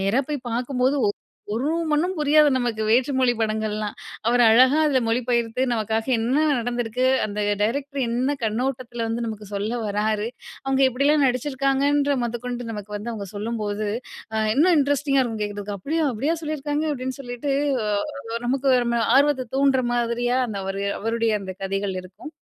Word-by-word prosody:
நேரா 200 +7 +2
போய் 280 -4 -4
பாக்கும்போது 255 +3 0
ஒ - - +3 0.4
ஒரு 250 +6 -1 0.2
மண்ணும் 320 +5 +1
புரியாது 300 0 +5
நமக்கு, 240 -3 -1
வேற்று 250 +5 +3
மொழி 255 -2 +4
படங்கள்லாம். 215 -1 -1 0.3
அவரு 240 +1 +4
அழகா 255 +5 +6
அதுல 275 -3 +3
மொழிபெயர்த்து 235 +1 0
நமக்காக 220 +2 -1
என்ன 235 +5 0 0.2
நடந்திருக்கு, 240 0 -2 0.2
அந்த 210 0 -4 0.2
டைரக்டரு 275 +5 -1
என்ன 260 +4 0
கண்ணோட்டத்துல 240 +1 -2
வந்து 230 +1 -2
நமக்கு 215 -2 -6
சொல்ல 205 +3 -2
வராரு. 210 +1 0 0.4
அவுங்க 270 0 +1
எப்படியெல்லாம் 280 +3 +2
நடிச்சிருக்காங்கன்ற 275 +2 +1
மொதக்கொண்டு 240 0 -4
நமக்கு 210 0 -7
வந்து 230 +3 -5
அவங்க 205 -3 -5
சொல்லும்போது, 210 -1 -3 0.5
அ - - 0 0.2
இன்னும் 330 +5 +4
இன்ட்ரெஸ்டிங்கா 280 -1 +2
இருக்கும் 225 -3 -3
கேக்குறதுக்கு. 205 0 -5
"அப்படியா? 315 - -1
அப்படியா 290 +9 0
சொல்லிருக்காங்க?" 300 0 -2
அப்டீன்னு 260 0 -4
சொல்லிட்டு 245 +2 -3 0.3
அ, - - -2 0.6
நமக்கு 270 +2 0 0.2
நம்ம 235 -1 +1
ஆர்வத்த 275 -3 +3
தூண்டுற 270 -1 +3
மாதிரியா, 240 +1 0
அந்த 205 - -4
அவரு 195 +1 -3 0.2
அவருடைய 230 +1 0
அந்த 190 -1 -6
கதைகள் 195 0 -2
இருக்கும். 185 - -11
245 Hz, 150 wpm, -23 LUFS, 220-275 Hz, 0.6 s, அழகா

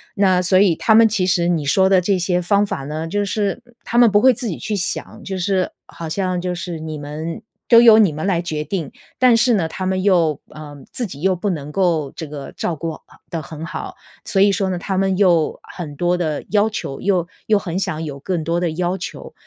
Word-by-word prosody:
那 190 -2 +3
所 185 +1 +3
以， 190 -4 +4
他 220 - +2
们 225 0 +7
其 205 -4 0
实 180 -2 +2
你 165 -4 0
说 190 +7 +3
的 190 -1 +5
这 190 +1 +1
些 180 0 +1
方 200 +3 +2
法 140 -8 -4
呢， 155 +3 -4
就 205 +4 -1
是， 200 0 -2
嗯， 240 - -23
他 235 - -2
们 240 -2 +6
不 205 +1 +4
会 260 +2 +6
自 235 - -4
己 175 - -4
去 215 - -3
想， 185 - -4
就 195 - -4
是 185 0 0 0.2
好 165 - -8
像 185 +1 -1
就 180 0 -2
是 175 -1 -5
你 155 -1 -6
们 150 +3 -6 0.3
都 230 -1 +8
由 230 -2 +8
你 210 -6 +5
们 155 +5 -4
来 175 -4 +1
决 155 -3 -3
定。 160 -1 -4 0.3
但 255 -2 +5
是 230 +2 +3
呢， 175 -6 0
他 185 +3 -5
们 185 0 -1
又 170 -7 +3 0.2
嗯， 145 -2 -10
自 245 - -3
己 145 -6 -10
又 190 +1 +2
不 190 +4 -2
能 150 -5 -4
够 165 -5 0
这 160 - -6
个 145 -2 -8
照 170 - -2
顾 165 +2 -4
好 - - -12 0.3
得 165 - -3
很 160 +1 -8
好， - - -6 0.3
所 195 - +1
以 200 0 +5
说 195 -1 0
呢， 185 - -2
他 190 +2 -3
们 190 -1 +1
又 175 -6 +2
很 155 -5 -8
多 175 +3 +1
的 155 -4 -2
要 210 +1 +3
求， 135 -10 -5
又 185 -4 +1 0.2
又 215 - +4
很 185 -2 -3
想 160 -4 -3
有 145 -3 -6
更 170 +2 -2
多 165 +2 0
的 175 -2 -1
要 180 +3 -1
求， 180 - -8
180 Hz, 260 characters per minute, -20 LUFS, 160-200 Hz, 0.3 s, 都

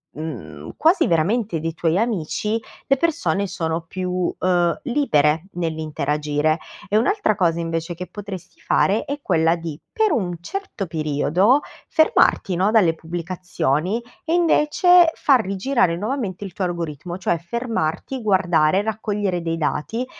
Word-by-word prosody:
mhmm, 130 - -7
quasi 330 +5 +4
veramente 175 +3 +1
dei 165 +1 -3
tuoi 165 +1 0
amici, 215 0 -1 0.3
le 275 - +3
persone 200 - 0
sono 165 -2 -2
più, 180 +1 -2
uhm, 175 -2 +1
libere 160 - +2
nell'interagire. 155 -2 -1 0.3
E 205 - +2
un'altra 260 - +2
cosa 170 -4 +1
invece 165 +1 -3
che 180 +2 -6
potresti 195 -3 -9
fare 205 +3 +1
è 285 +1 -4
quella 165 +1 +3
di, 165 -2 -6
per 440 -2 +2
un 175 -6 -1
certo 385 - -5
periodo, 165 - +2 0.3
fermarti 315 - +3
no, 190 +4 +2
dalle 195 -8 +4
pubblicazioni, 175 - -2 0.2
e 325 - -1
invece 345 +1 +5
far 260 -6 +3
rigirare 195 -1 +1
nuovamente 210 -3 -3
il 190 - -7
tuo 185 - -2
algoritmo, 170 0 -4
cioè, 175 -2 0
fermarti, 230 - -3
guardare, 185 -4 +3
raccogliere 205 -4 -2
dei 165 0 -2
dati, 225 +10 -2
180 Hz, 135 wpm, -22 LUFS, 165-225 Hz, 0.3 s, invece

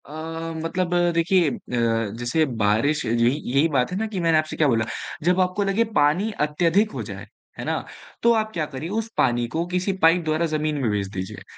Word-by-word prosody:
अ, - - -14 0.5
मतलब 175 +1 -1 0.2
देखिए 170 0 +3
अ, - - -4 0.6
जैसे 120 +7 +1 0.2
बारिश 110 +9 +2
यही 115 +1 +3 0.2
यही 140 +4 +4
बात 130 -2 +1
है 180 - -2
ना 220 - -1
कि 205 -3 -4
मैंने 165 -2 +3
आपसे 155 0 -2
क्या 155 - +3
बोला 115 -4 +2 0.4
जब 180 +3 +2
आपको 185 +2 0
लगे 195 +3 +2
पानी 155 +9 +3
अत्यधिक 170 +8 +1
हो - - -5
जाए, - - -8 0.3
है - - -4
ना? - - -1 0.4
तो 235 - +6
आप 220 -1 0
क्या 160 -2 -1
करिए 150 +3 -6
उस 225 0 -5
पानी 120 0 +2
को 165 +1 0
किसी 185 +2 0
पाइप 165 +2 +5
द्वारा 155 +2 +1
ज़मीन 155 -1 -1
में 120 - +1
भेज 100 -1 -1
दीजिए 95 -1 -6
160 Hz, 200 wpm, -23 LUFS, 140-180 Hz, 0.6 s, तो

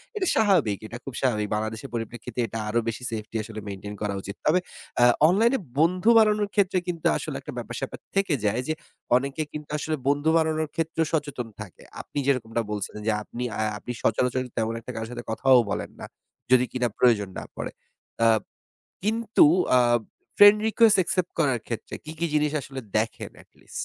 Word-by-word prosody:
এটা 380 -4 0
স্বাভাবিক 180 - +3
এটা 120 - -7
খুব 135 - -7
স্বাভাবিক। 110 -5 +1
বাংলাদেশের 110 +4 -4
পরিপ্রেক্ষিতে 120 +1 -5
এটা 115 - -6
আরো 120 - +2
বেশি 115 +2 -3
সেফটি 110 0 -6
আসলে 110 0 -8
মেইনটেইন 100 +1 -6
করা 105 -1 -1
উচিত। 100 +1 -7
তবে 170 +4 +4 0.4
আ - - +7 0.3
অনলাইন 220 +6 +4
এ - - -7 0.2
বন্ধু 180 +7 +3
বানানোর 210 -2 +4
ক্ষেত্রে 190 -2 +3
কিন্তু 170 -3 -4
আসলে - - -5
একটা - - -8
ব্যাপার-স্যাপার - - -5 0.2
থেকে 195 -4 +2
যায় 110 +4 +1
যে 155 - +1 0.4
অনেকে 140 +4 0
কিন্তু 150 -1 -7
আসলে 155 +1 -2
বন্ধু 145 +2 +2
বানানোর 160 -1 0
ক্ষেত্রেও 165 0 0
সচেতন 145 -6 -2
থাকে। 100 -5 -11 0.2
আপনি - - -11
যেরকমটা 115 -4 +1
বলছিলেন 105 0 -4
যে - - +4
আপনি 120 +3 -6 0.2
আ - - +1 0.2
আপনি 120 - -7
সচরাচর 125 +3 +1 0.2
তেমন 115 0 0
একটা 120 +2 -8
কারো 110 0 -4
সাথে 120 0 -6
কথাও 130 +3 +5
বলেন - - -3
না। - - -6 0.5
যদি 125 -1 +6
কিনা 125 -1 0
প্রয়োজন 110 -6 +3
না - - -5
পড়ে। - - -4 0.5
আ - - +7 0.8
কিন্তু 220 -2 +4 0.3
আ - - +6 0.6
ফ্রেন্ড 205 +1 +9
রিকোয়েস্ট 220 -1 +5
অ্যাকসেপ্ট 180 0 0
করার 135 -6 +2
ক্ষেত্রে 115 - -5
কি, 155 - -7
কি 170 - +1
জিনিস 150 -1 +2
আসলে 135 0 -7 0.2
দেখেন 110 +1 -2
at - - -38
least? - - -22
130 Hz, 180 wpm, -25 LUFS, 115-165 Hz, 0.8 s, ফ্রেন্ড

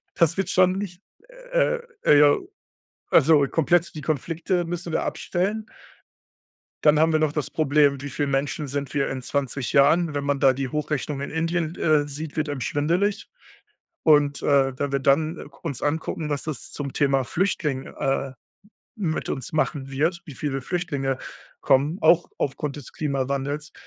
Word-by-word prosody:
Das 170 0 +3
wird 195 - -1
schon 185 0 +4
nicht 190 -2 -5 0.5
äh - - +2 0.2
äh, 145 -1 +6
ja 145 -1 +6 0.8
also 145 -1 +5
komplett 170 +2 +1
die 155 - -6
Konflikte 165 +5 -1
müssen 175 0 -5
wir - - 0
abstellen. 205 +5 -2 1.2
Dann 150 0 +5
haben 160 +1 +4
wir 155 - +2
noch 155 -2 +2
das 150 -3 -2
Problem: 145 -2 +2
„Wie 140 - -5
viele 145 0 -2
Menschen 140 +2 -1
sind 140 +1 -4
wir 140 -2 0
in 130 -1 -4
20 135 -1 -2
Jahren?“ 155 +4 +4
Wenn 145 -1 -2
man 140 -1 0
da 135 -2 +5
die 135 +1 -3
Hochrechnung 150 -2 -2
in - - -4
Indien 165 +1 -1
d - - -9
äh, 150 -2 +3
sieht, 150 +2 -7
wird 155 -1 0
einem 140 -3 -4
schwindelig. 175 - 0 0.8
Und, 145 -2 +4
äh, 135 -2 +2
wenn 145 -1 -2
wir 140 - +2
dann, 155 +5 +2
äh, - - -8
k 140 -1 -17
uns 145 -7 -4
angucken, 155 0 -2
was 145 - -1
das 155 -5 -6
zum 140 -2 -5
Thema 135 -3 +2
Flüchtling, 150 -6 -1
äh, 135 0 -2 0.6
mit 170 -7 -2
uns 130 -3 -4
machen 145 -3 -1
wird 165 +6 0
wie 145 - -10
viele 135 -2 -2
Flüchtlinge 140 -6 -2 0.4
kommen, 145 +7 +2
auch 170 +2 +4
aufgrund 140 +1 -2
des 145 -4 -10
Klimawandels. 140 +1 -2
150 Hz, 170 wpm, -24 LUFS, 140-165 Hz, 1.2 s, äh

